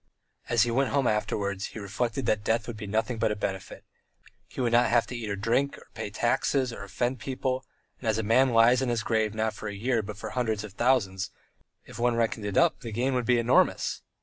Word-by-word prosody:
As 120 -2 +4
he 120 - 0
went 135 +2 +2
home 140 -2 +1
afterwards, 100 -2 -1
he - - -4
reflected 115 +5 -2
that 105 -1 +1
death 115 +2 +1
would 120 - -6
be 105 -1 -7
nothing 110 +3 -1
but 110 -1 +2
a - - -1
benefit; 95 -2 -5 0.6
he - - -11
would 120 -2 +1
not 120 0 +4
have 120 0 +3
to 125 - -7
eat 115 -3 -4
or 100 - -1
drink, 120 +8 0
or - - -17
pay - - -5
taxes 130 -3 0
or 100 - -7
offend 120 +5 -2
people, 130 +1 -3 0.3
and, 115 - -2
as 110 - +1
a 110 - -1
man 125 +5 +4
lies 120 +2 +5
in 130 - 0
his 115 -3 0
grave 110 -1 0
not 110 0 0
for 110 - -6
one 100 - -6
year 120 +2 +1
but 105 -1 -8
for 110 0 -6
hundreds 110 -5 -1
and 105 -3 -9
thousands, 100 -6 +1 0.6
if - - -11
one 120 0 +2
reckoned 115 -2 -1
it 100 - -2
up - - +4
the 115 - -7
gain 125 +5 0
would 125 -2 -1
be 125 -1 +4
enormous. 120 +2 +2
115 Hz, 235 wpm, -27 LUFS, 105-125 Hz, 0.6 s, lies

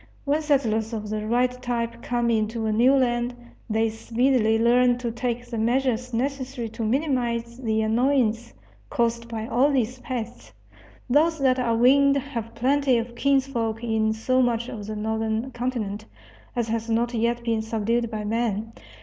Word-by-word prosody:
When 295 +2 +1
settlers 235 -7 +1
of 210 -1 -4
the 215 0 -3
right 245 +2 +2
type 235 -1 -3
come 240 -1 0
into 220 0 0
a 220 - +1
new 240 +5 +4
land 240 -2 +1 0.3
they 220 +1 +2
speedily 225 0 +1
learn 245 +2 +4
to 245 -2 -3
take 240 0 -3
the 235 -2 -5
measures 250 +1 0
necessary 260 -1 -3
to 225 +1 -5
minimize 235 -2 -1
the 220 -3 0
annoyance 230 - +1 0.4
caused 235 0 0
by 220 -1 -4
all 250 +5 +3
these 255 -2 0
pests. 250 -3 -6 0.5
Those 315 +5 +3
that 260 -3 +2
are 235 -2 +1
winged 275 +4 +5
have 245 -5 -5
plenty 270 +1 +2
of 235 +1 -3
kinsfolk 240 -4 0
in 220 -1 +1
so 255 +4 +1
much 240 -1 0
of 210 -2 -7
the 215 - -4
northern 220 +3 -2
continent 230 -4 -3 0.5
as 240 -2 0
has 230 0 -2
not 235 +2 +1
yet 235 +1 0
been 225 -2 0
subdued 225 +1 -1
by 215 -2 -4
man. 225 0 -1
235 Hz, 160 wpm, -24 LUFS, 225-255 Hz, 0.5 s, winged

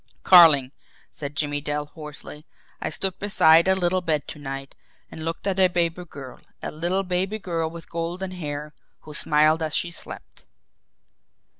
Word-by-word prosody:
"Carling," 155 -8 +7 0.4
said 145 0 -7
Jimmie 145 -1 -1
Dale 145 0 -3
hoarsely, 150 0 -11 0.3
"I - - -2
stood 190 -2 -3
beside 170 -5 +5
a 190 - +4
little 185 0 +1
bed 155 -4 -1
to 150 - -8
night 135 -1 -6 0.4
and 160 - -8
looked 165 +3 -4
at 195 -1 -1
a 185 - +6
baby 175 0 -1
girl 135 -5 -10 0.2
a - - -3
little 175 +5 -1
baby 190 +3 -1
girl 165 -5 -2
with 165 0 -10
golden 175 +3 -4
hair, 150 -4 -6 0.3
who 155 - -11
smiled 155 +2 +3
as 155 -1 -1
she 175 - 0
slept." - - -11
165 Hz, 160 wpm, -24 LUFS, 150-180 Hz, 0.4 s, Carling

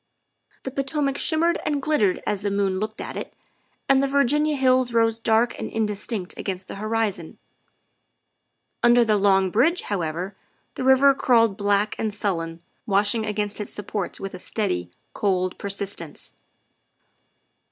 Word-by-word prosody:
The 265 - -4
Potomac 275 +1 -1
shimmered 335 +3 +2
and 295 -2 0
glittered 265 -10 +1
as 205 -2 -1
the 205 - -1
moon 195 -2 0
looked 215 +1 -4
at - - -6
it, - - -6 0.5
and 270 0 +4
the 275 - +1
Virginia 290 +2 +2
hills 255 -2 +2
rose 225 0 +2
dark 225 +1 +2
and - - -4
indis 210 -2 -2
tinct 205 -7 -3
against 190 -1 -4
the - - -7
horizon. 215 -6 -2 1.4
Under 240 0 +5
the 215 -1 +3
Long 195 -2 +3
Bridge, 320 - +2
how 200 -3 -2
ever, 170 +5 -4 0.4
the - - -5
river 265 +1 +6
crawled 230 -6 +3
black 205 +1 +1
and 220 - -1
sullen, 170 -5 -3 0.2
washing 205 +2 +2
against 210 0 -2
its 210 - -5
supports 205 -2 -4
with 195 0 -6
a 185 - -7
steady, 90 - -2 0.2
cold 185 -2 0
persistence. 195 -5 -5
215 Hz, 150 wpm, -24 LUFS, 195-255 Hz, 1.4 s, river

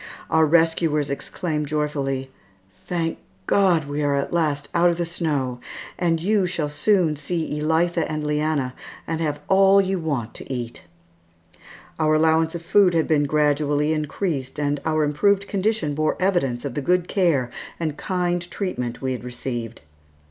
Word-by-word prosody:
Our 160 -1 +4
rescuers 160 -2 +2
exclaimed 150 +1 -3
joyfully, 140 -3 -2 0.6
"Thank 165 -2 -2 0.3
God, 175 - +3
we 145 +1 -2
are 145 -1 +1
at 140 +3 -2
last 150 -4 0
out 175 +1 +4
of 170 - -1
the 175 - -1
snow, 145 -7 -2 0.4
and 170 -2 +1
you 195 +2 +2
shall 165 -4 -2
soon 165 +1 +2
see 150 0 -3
Elitha 165 +1 +1
and 155 0 -2
Leanna, 150 -3 0 0.3
and 165 0 -3
have 150 -2 -2
all 195 0 +6
you 190 -1 +1
want 140 -9 -3
to - - -9
eat." 120 -2 -5 1.2
Our 155 -1 +3
allowance 160 +1 +3
of 170 - -6
food 185 0 +4
had 160 - +2
been 150 -2 +3
gradually 150 0 +1
increased 150 -2 -3
and 145 -1 0
our 155 -1 +2
improved 195 +7 +2
condition 200 -6 0
bore 155 +1 0
evidence 170 -10 0
of 140 - -3
the 145 - -2
good 180 +4 +1
care 155 -11 +1 0.3
and 155 -3 -2
kind 175 +1 -1
treatment 125 - -4
we 130 - 0
had 125 -2 -4
received. 120 -2 -5
155 Hz, 155 wpm, -23 LUFS, 145-175 Hz, 1.2 s, all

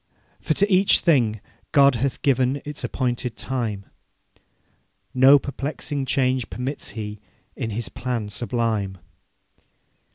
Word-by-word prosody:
For 155 - -1
to 200 - +3
each 195 0 +4
thing 120 - +2 0.3
God 140 -1 +6
hath 130 +2 -2
given 130 0 +2
Its 150 0 -6
appointed 125 -2 -2
time; 115 -7 -3 1.3
No 135 +3 +7
perplexing 140 0 -4
change 130 -2 +1
permits 130 +4 -4
He 105 -1 -5 0.4
In 115 - -3
His 110 +1 -3
plan 120 -5 -4
sublime. 110 -4 -1
125 Hz, 110 wpm, -23 LUFS, 115-140 Hz, 1.3 s, No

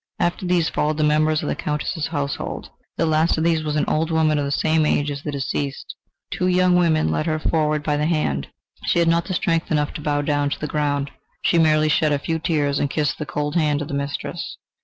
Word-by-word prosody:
After 175 +1 -1
these 175 -2 +2
followed 150 0 0
the 155 - +1
members 155 +1 +2
of - - -3
the - - -1
Countess's 150 +1 -2
household. 145 -3 -4 0.3
The - - +2
last 160 +1 +2
of 160 - 0
these 165 -1 +2
was 150 -1 -2
an 150 - +1
old 160 +1 0
woman 155 -2 +2
of 145 - -1
the - - -2
same 160 +2 +2
age 145 -1 +1
as 140 0 -5
the 150 - -4
deceased. 140 0 -3 0.4
Two 180 - 0
young 180 0 +3
women 160 - +3
led 75 0 -1
her 155 - +1
forward 155 -1 0
by 150 -1 0
the 150 +1 +1
hand. 70 - 0 0.4
She - - +2
had 170 -1 +3
not 170 0 +2
strength 170 -3 0
enough 150 -1 +1
to - - -6
bow 145 -1 0
down 145 -1 +1
to - - -4
the - - -3
ground 145 -2 -1 0.3
she 170 - +3
merely 155 -1 +4
shed 155 0 +2
a - - +2
few 160 +3 -2
tears 145 -4 0
and 145 - 0
kissed 145 -3 -1
the 150 - -4
cold 150 +1 -2
hand 150 -4 +2
of 145 - -9
her 140 - -3
mistress. 140 0 -4
155 Hz, 235 wpm, -22 LUFS, 145-160 Hz, 0.4 s, merely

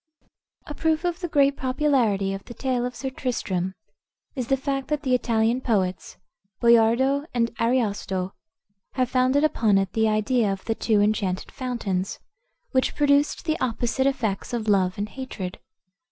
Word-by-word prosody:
A 295 - -6
proof 320 +2 0
of 350 0 -1
the 355 - -3
great 280 -3 +3
popularity 255 -8 +1
of 195 0 -6
the 240 - -10
tale 250 -2 -1
of 250 - -8
Sir 265 +3 -4
Tristram 190 -8 -2 0.6
is 255 -5 -4
the 270 - +2
fact 275 0 -2
that 300 0 -2
the 255 - +1
Italian 235 0 +1
poets, 190 -7 -1 0.4
Boiardo 235 +5 +4
and 235 -1 +1
Ariosto, 205 -6 0 0.6
have 255 -1 0
founded 260 +3 +3
upon 220 -9 +3
it 195 -1 0
the 220 -1 +2
idea 215 0 +1
of 195 -1 -5
the 225 - 0
two 220 -2 +1
enchanted 205 -3 0
fountains, 210 -8 -3 0.5
which 260 -1 +1
produced 290 +2 +2
the 315 -1 0
opposite 250 +2 0
effects 245 -4 -2
of 225 -2 -2
love 190 -3 +2
and 205 +1 -2
hatred. 210 -8 -6
240 Hz, 155 wpm, -24 LUFS, 205-270 Hz, 0.6 s, Boiardo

